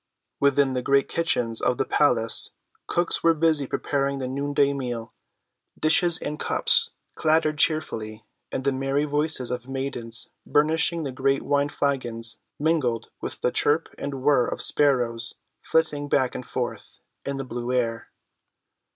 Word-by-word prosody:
Within 140 -1 +3
the 125 - -1
great 140 +2 +2
kitchens 125 -9 0
of 125 - +1
the - - 0
palace 115 -6 +2 0.3
cooks 175 0 +1
were 165 -1 +4
busy 155 -3 +2
preparing 140 0 -1
the 130 -1 -3
noonday 140 +1 +1
meal; 120 -4 -5 0.7
dishes 165 +2 +4
and 150 -3 -5
cups 465 -1 +3 0.2
clattered 155 -1 +1
cheerfully, 110 -10 -1 0.3
and 130 - -3
the 140 - +2
merry 135 +2 0
voices 145 -4 0
of 125 +1 -5
maidens 130 -4 -5 0.2
burnishing 160 +2 +1
the 140 - -3
great 135 +2 0
wine‐flagons 140 -5 -1 0.2
mingled 145 -7 0
with - - -5
the 125 - +1
chirp 150 +3 +1
and 140 -2 -5
whir 135 -4 +4
of - - -4
sparrows 120 -5 +1 0.3
flitting 145 -3 0
back 130 -3 +2
and 125 - -7
forth 125 -2 -5 0.3
in 140 0 -3
the 135 - -3
blue 120 0 -4
air. 115 -3 -1
140 Hz, 140 wpm, -25 LUFS, 125-150 Hz, 0.7 s, were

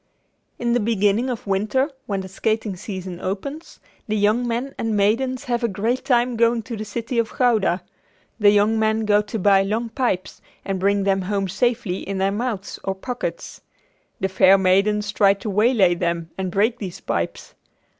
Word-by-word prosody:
In 240 -1 0
the 245 - +3
beginning 215 +2 +1
of 245 -3 -4
winter 215 +9 0 0.2
when 195 -2 -2
the 190 - -7
skating 215 +1 -2
season 185 -2 -7
opens, 275 - -5 0.3
the 215 - -1
young 215 +4 +2
men 240 +4 -2
and 225 -2 0
maidens 245 +6 +1
have 240 -1 -2
a - - +3
great 225 +5 -1
time 245 -2 +2
going 230 0 +2
to 235 - -6
the 215 0 -5
city 230 +3 -3
of 230 - -2
Gouda. 220 -8 +2 0.6
The 205 -1 +6
young 210 +2 +3
men 220 0 +1
go 210 0 +4
to 215 +2 -5
buy 195 -1 +4
long 220 +4 -1
pipes 225 -7 -2 0.2
and 195 -1 -2
bring 200 +1 +2
them 195 0 +1
home 195 +1 -1
safely 195 -1 0
in 195 0 -5
their 195 +1 +1
mouths 210 -2 -3
or 195 - -2
pockets. 250 - -5 0.6
The 190 - 0
fair 190 0 +5
maidens 200 +2 +2
try 200 -1 +4
to 205 +1 -5
waylay 210 -3 +4
them 170 -1 -2
and 190 -1 -3
break 215 +6 +1
these 185 -4 -6
pipes. - - -3
210 Hz, 180 wpm, -22 LUFS, 195-235 Hz, 0.6 s, The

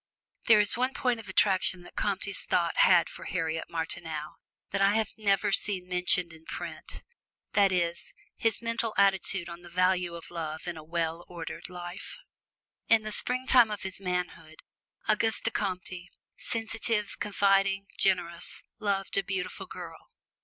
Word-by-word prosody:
There 220 -3 +7
is 205 -1 +5
one 255 +2 0
point 245 -3 0
of 210 -3 -10
attraction 185 -2 +2
that - - -15
Comte's 200 -1 0
thought 170 -1 0
had 175 -2 +6
for - - -10
Harriet 160 -3 -2
Martineau 160 -2 -4 0.3
that 195 - -1
I 200 +1 +4
have 220 -2 0
never 205 -1 +1
seen 190 -2 +3
mentioned 180 -1 +1
in 160 0 -15
print - - -7 0.5
that 200 -2 +4
is, 170 -2 -2 0.2
his 225 0 0
mental 230 -1 -1
attitude 195 -2 +2
on 170 0 -9
the 175 - -12
value 180 -1 +1
of 170 - -9
love 160 -1 -5
in 175 - -3
a 160 - -9
well 165 +1 -2
ordered 170 +1 -4
life. 175 +1 -8 0.7
In 225 -1 +5
the 215 - -4
springtime 250 0 +4
of 210 -2 -5
his 190 0 -3
manhood, 180 -3 -4 0.4
Auguste 220 +1 +1
Comte, 185 -2 -3 0.3
sensitive, 225 -2 0
confiding, 195 -1 +2
generous, 175 -3 +1 0.2
loved 200 -2 0
a - - -2
beautiful 185 -1 -4
girl. - - -9
190 Hz, 150 wpm, -29 LUFS, 175-205 Hz, 0.7 s, There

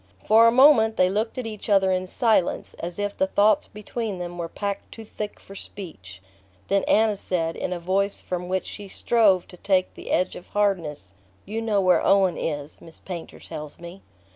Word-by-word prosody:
For 225 +2 +6
a - - +6
moment 240 -4 +6
they 185 0 +4
looked 220 +4 -2
at 255 - -3
each 215 -1 -7
other 195 -2 +4
in 185 0 -1
silence, 215 -3 +1
as 170 +1 -5
if 205 0 -2
the 190 - +1
thoughts 205 +2 +3
between 210 -1 -5
them 175 0 -6
were 165 -1 -3
packed 200 +1 -4
too 225 - -10
thick 210 0 -6
for 195 - -13
speech; 95 - -9 0.5
then 200 0 +2
Anna 220 -1 +3
said, 165 -4 -2
in - - -4
a 180 - -2
voice 195 +3 0
from 180 -1 -4
which 190 0 -1
she 205 -1 -8
strove 200 -3 +2
to 180 - -12
take 185 0 +1
the - - -10
edge 185 - +1
of 180 - -10
hardness: 165 - -1 0.3
"You 220 +3 -4
know 215 -3 +1
where 185 -1 +3
Owen 195 -2 +4
is, 145 -1 -4
Miss 165 - -12
Painter 175 -3 -8
tells 150 -2 -8
me." 175 +3 -11
195 Hz, 195 wpm, -24 LUFS, 175-210 Hz, 0.5 s, For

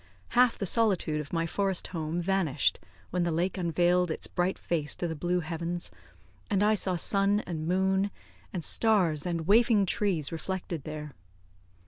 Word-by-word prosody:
Half 245 -1 +4
the 200 - -2
solitude 185 -8 +1
of 145 - -10
my 165 -1 0
forest 190 +2 -1
home 165 0 -3
vanished 190 -6 +1 0.3
when 180 - 0
the 170 -1 +1
lake 175 +3 0
unveiled 175 0 +2
its 160 - -3
bright 180 +1 -1
face 155 -4 -2
to 175 - -2
the 160 - -4
blue 175 +3 0
heavens, 170 +1 -4 0.6
and 200 0 +2
I 215 +1 +4
saw 190 -3 +1
sun 200 +4 +3
and 160 -4 -5
moon, 190 +2 +2 0.4
and 175 -4 -4
stars 180 -9 +2
and 165 -2 -2
waving 215 +1 +4
trees 180 -6 0
reflected 170 -2 -4
there. 150 -1 -6
175 Hz, 160 wpm, -29 LUFS, 165-195 Hz, 0.6 s, Half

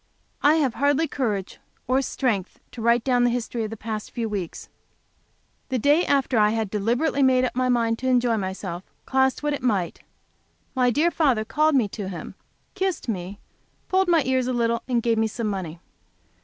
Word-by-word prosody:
I 295 +2 +5
have 280 -7 +1
hardly 285 +4 +2
courage 210 -10 -3 0.3
or 260 +2 +2
strength 230 -8 -2
to 240 - -8
write 235 +1 +3
down 250 -2 +2
the 245 - +4
history 235 -1 -2
of - - -5
the 225 - -7
past 215 0 -5
few 230 -2 -3
weeks. 195 -6 -5 1.0
The 260 - 0
day 290 +8 +3
after 270 -4 +2
I 210 0 +5
had 220 -2 -2
deliberately 240 +8 0
made 255 -1 +4
up 250 - -4
my 255 0 +1
mind 230 -2 +1
to 260 - -3
enjoy 245 -2 +3
myself, 190 -3 -4 0.2
cost 265 +1 +1
what 295 0 0
it 285 - -4
might, 200 -8 0 0.7
my 250 -2 +3
dear 310 +8 +2
father 260 -11 +2
called 305 +4 +2
me 245 -6 +3
to 195 -1 -5
him, 180 - -7 0.4
kissed 380 -9 -2
me, 190 -1 -4 0.5
pulled 380 0 +2
my 335 -4 +4
ears 260 -1 +1
a 255 - -1
little, 235 -1 0
and 240 -3 0
gave 230 -2 +2
me 225 - +2
some 230 +1 -4
money. 185 -5 -4
245 Hz, 190 wpm, -24 LUFS, 215-265 Hz, 1.0 s, I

